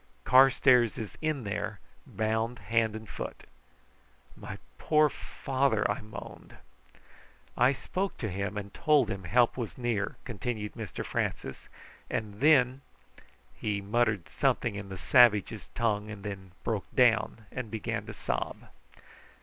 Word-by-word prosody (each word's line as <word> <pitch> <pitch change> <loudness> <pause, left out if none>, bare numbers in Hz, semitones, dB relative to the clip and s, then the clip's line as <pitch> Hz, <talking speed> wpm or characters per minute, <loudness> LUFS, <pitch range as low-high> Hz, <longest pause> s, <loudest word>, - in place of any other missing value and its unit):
Carstairs 130 -3 +5
is 110 -3 -6
in 155 -4 -1
there, 100 - -3 0.3
bound 110 +2 -1
hand 110 +1 +1
and 110 0 -8
foot." - - -7 0.9
"My - - -8 0.2
poor 150 -1 +4
father!" 130 -6 -1
I 105 - -3
moaned. 105 -1 -10 1.0
"I 125 +2 +5
spoke 190 +7 -3
to 110 - -3
him 100 +3 -3
and 100 -1 -6
told 150 -8 +3
him 95 -2 -5
help 120 +8 +3
was 110 -8 -4
near," 120 -5 -1
continued 110 -2 -4
Mr 110 -5 -6
Francis; - - -3 0.4
"and 105 -2 -3
then 135 -3 +5 0.4
" - - -26
He 105 -1 0
muttered 105 -1 0
something - - +1
in 100 -1 -6
the 95 - -6
savages' 110 -2 +4
tongue, 105 -2 0
and 105 -2 -8
then 95 -3 -7
broke 110 -3 -2
down 115 -3 +3
and 125 -3 -5
began 110 -1 -3
to - - -6
sob. - - -3
110 Hz, 135 wpm, -29 LUFS, 105-125 Hz, 1.0 s, Carstairs